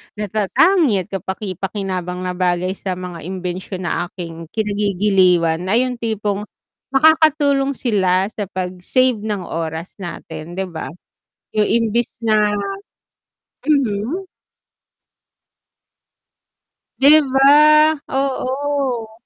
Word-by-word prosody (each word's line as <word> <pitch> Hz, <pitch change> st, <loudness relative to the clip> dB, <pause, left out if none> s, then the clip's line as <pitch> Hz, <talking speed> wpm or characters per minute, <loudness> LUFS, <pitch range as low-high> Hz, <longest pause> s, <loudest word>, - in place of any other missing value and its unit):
natatangi 215 Hz, -, +2 dB
at -, -, -22 dB
kapaki-pakinabang 190 Hz, -1 st, -4 dB
na 180 Hz, -, -2 dB
bagay 180 Hz, 0 st, 0 dB
sa 185 Hz, -2 st, -3 dB
mga 180 Hz, -2 st, -7 dB
imbensyon 185 Hz, 0 st, -5 dB
na 175 Hz, 0 st, -1 dB
aking 165 Hz, -2 st, -8 dB
kinagigiliwan 190 Hz, -5 st, +2 dB
ay 230 Hz, +6 st, +3 dB
yung 250 Hz, -2 st, -4 dB
tipong 210 Hz, -2 st, -2 dB, 0.5 s
makakatulong 285 Hz, -2 st, +4 dB
sila 195 Hz, -4 st, +1 dB
sa 205 Hz, -3 st, -5 dB
pag-save 190 Hz, +7 st, 0 dB
ng 205 Hz, -3 st, -3 dB
oras 165 Hz, +1 st, -5 dB
natin, 170 Hz, -2 st, -8 dB
'di 190 Hz, -, -1 dB
ba? 160 Hz, -, -5 dB, 0.7 s
Yung 210 Hz, -, +4 dB
imbis 230 Hz, +1 st, +1 dB
na 215 Hz, -2 st, +2 dB, 1.2 s
mhm. 275 Hz, -, 0 dB, 2.8 s
'Di 295 Hz, +3 st, +8 dB
ba? 305 Hz, +3 st, +6 dB
Oo. 265 Hz, -3 st, -1 dB
205 Hz, 95 wpm, -19 LUFS, 180-255 Hz, 2.8 s, Di